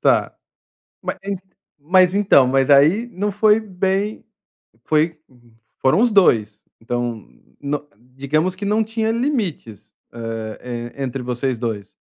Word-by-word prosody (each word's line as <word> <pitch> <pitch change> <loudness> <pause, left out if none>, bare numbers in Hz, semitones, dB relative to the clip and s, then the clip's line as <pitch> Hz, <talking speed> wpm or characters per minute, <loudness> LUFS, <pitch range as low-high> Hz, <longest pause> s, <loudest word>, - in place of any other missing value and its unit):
Tá. - - +2 0.7
Ma - - -4
en 200 -1 -3 0.4
mas 180 +4 +4
então, 190 -10 +5
mas 135 +1 +2
aí 160 +12 +5
não 205 +2 -1
foi 210 +2 +4
bem 195 +1 -2 0.6
foi 155 +1 +1 0.6
foram 135 +9 +3
os 240 -1 +3
2. 110 - +3 0.2
Então, 120 -1 -3 0.4
no 145 +1 -3 0.3
digamos 155 +7 0
que 200 +2 -6
não 215 +2 +2
tinha 220 0 -1
limites, 195 - -3 0.4
hã, 110 -1 -5
eh, 120 +2 -6
entre 130 0 -3
vocês 125 0 -2
2. 110 -4 -5
150 Hz, 130 wpm, -20 LUFS, 120-200 Hz, 0.7 s, então